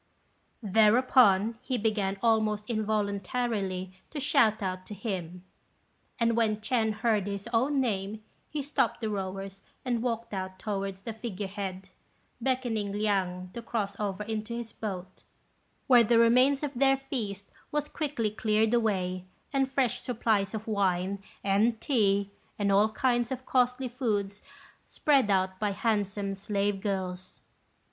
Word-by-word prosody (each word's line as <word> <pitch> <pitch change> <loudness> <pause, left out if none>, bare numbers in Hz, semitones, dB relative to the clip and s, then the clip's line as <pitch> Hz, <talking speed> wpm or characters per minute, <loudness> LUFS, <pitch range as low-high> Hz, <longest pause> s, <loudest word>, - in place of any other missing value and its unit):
Thereupon 220 0 +4
he 255 0 -2
began 205 -3 0
almost 215 -2 +2
involuntarily 205 -3 -1 0.2
to 305 - -5
shout 235 -7 +3
out 185 -1 -3
to 210 - -7
him; 180 -4 -5 0.8
and 230 -1 +2
when 220 -2 +2
Ch'ên 220 0 0
heard 215 -2 +1
his 200 +1 -4
own 270 +5 +2
name, 215 -3 -2 0.3
he 295 -2 -3
stopped 285 - 0
the 220 -1 -1
rowers, 195 0 -4 0.2
and 240 -2 0
walked 230 -2 -2
out 185 -1 -4
towards 195 -1 -3
the 225 +2 -5
figure 215 -3 -5
head, 190 -1 -5 0.5
beckoning 235 -5 0
Liang 190 -3 -1
to 235 - -5
cross 210 -4 -2
over 205 -1 -2
into 220 +1 -4
his 235 -1 -6
boat, 185 -3 -6 0.6
where 245 -3 +7
the 230 +1 +3
remains 255 +5 +5
of 290 -1 -2
their 270 +1 +4
feast 220 -8 -5 0.2
was 295 0 -1
quickly 280 -9 -2
cleared 220 +1 +1
away, 185 -6 0 0.3
and 270 -1 +1
fresh 265 -4 +1
supplies 220 -5 0
of 220 +1 -6
wine, 195 -2 0 0.2
and 215 +4 +2
tea, 200 -7 +2 0.3
and 200 -1 +1
all 205 +2 +5
kinds 240 +2 +1
of 260 0 -4
costly 250 0 +2
foods 210 -5 -2 0.5
spread 275 -7 +2
out 190 -1 +1
by 210 -2 0
handsome 200 -2 -1
slave 200 0 -1
girls. 185 -3 -4
215 Hz, 140 wpm, -29 LUFS, 195-235 Hz, 0.8 s, where